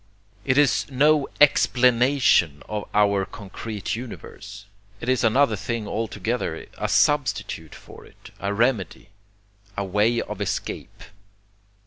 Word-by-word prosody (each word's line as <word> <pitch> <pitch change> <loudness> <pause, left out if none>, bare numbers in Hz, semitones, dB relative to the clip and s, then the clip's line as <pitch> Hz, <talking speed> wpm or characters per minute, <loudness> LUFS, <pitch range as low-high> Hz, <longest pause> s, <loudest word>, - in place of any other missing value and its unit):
It 130 -1 +1
is 145 -2 +3
no 145 +2 +3
EXPLANATION 125 - +3
of 105 -1 -5
our 100 -2 +3
concrete 105 +1 -6
universe, 115 -4 -9 0.3
it - - -7
is 130 -1 +1
another 115 +1 +3
thing 105 +2 -4
altogether, 110 -4 -3
a 105 - -1
substitute 125 - 0
for - - -14
it, - - -17
a 100 - -2
remedy, 110 -2 -1 0.7
a 100 - -1
way 105 +5 +1
of - - -5
escape. - - -4
115 Hz, 115 wpm, -23 LUFS, 100-130 Hz, 0.7 s, is